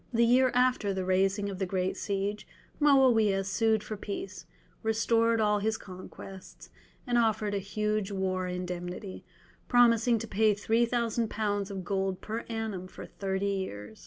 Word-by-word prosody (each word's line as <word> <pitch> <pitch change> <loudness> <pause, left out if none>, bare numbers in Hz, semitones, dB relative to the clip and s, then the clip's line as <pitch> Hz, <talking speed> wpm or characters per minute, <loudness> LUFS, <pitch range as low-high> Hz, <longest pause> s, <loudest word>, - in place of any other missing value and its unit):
The 235 -1 +3
year 255 +2 +5
after 250 -6 +2
the 190 -1 -2
raising 195 +2 +1
of 195 -2 -5
the 190 - -1
great 185 0 -1
siege, 200 +1 -3 0.3
Moawiah 240 -9 +4
sued 220 +2 +1
for 215 - -5
peace, 195 -4 -6 0.3
restored 230 +1 +2
all 210 -1 +2
his 220 +2 0
conquests, 185 0 -11 0.3
and 240 -1 +2
offered 220 -2 +1
a 200 - 0
huge 210 +1 -2
war 185 -1 -1
indemnity, 180 +2 -5 0.4
promising 235 -1 +4
to 230 +1 -5
pay 215 0 +2
3000 230 +1 0
lbs. 205 -2 -1
of 195 -2 -5
gold 190 -2 -1
per 220 +2 -4
annum 220 -5 -4
for - - -10
thirty 195 0 -3
years. 110 - -4
205 Hz, 150 wpm, -29 LUFS, 190-225 Hz, 0.4 s, year